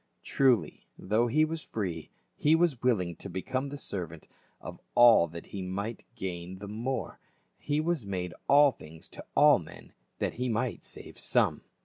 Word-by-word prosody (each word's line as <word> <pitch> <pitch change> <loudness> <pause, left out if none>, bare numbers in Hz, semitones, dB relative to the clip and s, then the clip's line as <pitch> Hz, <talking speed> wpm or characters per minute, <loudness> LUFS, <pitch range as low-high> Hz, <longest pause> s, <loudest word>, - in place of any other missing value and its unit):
Trul)', 125 - +3 0.3
though 110 +5 +1
he 155 +6 +3
was 160 0 -4
free, 90 - -4 0.3
he 150 +2 +4
was 165 -7 +1
willing 95 -9 +1
to 100 - -8
become 130 +9 -3
the 145 - -6
servant 85 - -6 0.3
of - - -9 0.2
all 120 -8 +7
that 85 +1 -9
he 100 - -7
might 100 +4 -4
gain 90 0 -5
the 100 +2 -8
more, 115 +4 -4 0.4
he 145 0 -1
was 160 -4 0
made 90 -3 -4 0.2
all 145 0 +7
things 80 -7 -13
to - - -10
all - - +7
men - - -13 0.2
that - - -1
he 125 - 0
might 120 +2 -2
save - - -10
some. - - +1
110 Hz, 165 wpm, -29 LUFS, 90-135 Hz, 0.4 s, all